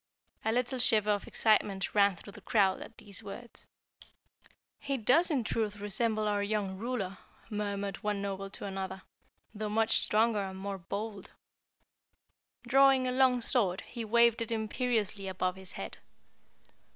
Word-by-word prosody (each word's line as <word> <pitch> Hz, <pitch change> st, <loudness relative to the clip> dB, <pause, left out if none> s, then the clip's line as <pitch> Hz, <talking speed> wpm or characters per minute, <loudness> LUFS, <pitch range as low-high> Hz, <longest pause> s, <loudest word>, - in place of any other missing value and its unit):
A 220 Hz, -, +1 dB
little 250 Hz, +2 st, -1 dB
shiver 215 Hz, -3 st, +6 dB
of 205 Hz, -1 st, -1 dB
excitement 205 Hz, -3 st, +1 dB
ran 200 Hz, -2 st, +4 dB
through 200 Hz, +3 st, -13 dB
the 210 Hz, -, -12 dB
crowd 195 Hz, -2 st, +2 dB
at -, -, -10 dB
these 200 Hz, +1 st, -7 dB
words. 225 Hz, +3 st, -10 dB, 1.1 s
"He 275 Hz, -1 st, -2 dB
does 260 Hz, +10 st, +4 dB
in 275 Hz, -7 st, +1 dB
truth 215 Hz, -2 st, -2 dB
resemble 215 Hz, +1 st, 0 dB
our 205 Hz, -1 st, +1 dB
young 200 Hz, -2 st, -1 dB
ruler," 210 Hz, -5 st, -3 dB, 0.3 s
murmured 200 Hz, -1 st, -3 dB
one 210 Hz, -1 st, -2 dB
Noble 195 Hz, 0 st, -4 dB
to 195 Hz, -, -7 dB
another, 190 Hz, -1 st, -5 dB, 0.5 s
"though 215 Hz, 0 st, -4 dB
much 220 Hz, +1 st, +3 dB
stronger 220 Hz, 0 st, +2 dB
and 190 Hz, -1 st, -5 dB
more 195 Hz, 0 st, -5 dB
bold." 200 Hz, +2 st, -6 dB, 1.4 s
Drawing 270 Hz, +1 st, +5 dB
a 255 Hz, -, 0 dB
long 255 Hz, -1 st, +3 dB
sword, 200 Hz, -6 st, +1 dB
he 235 Hz, -2 st, -7 dB
waved 235 Hz, +1 st, +4 dB
it 230 Hz, -, -3 dB
imperiously 220 Hz, -3 st, -1 dB
above 185 Hz, -1 st, -1 dB
his 190 Hz, -1 st, -9 dB
head. -, -, -7 dB
210 Hz, 150 wpm, -31 LUFS, 195-235 Hz, 1.4 s, shiver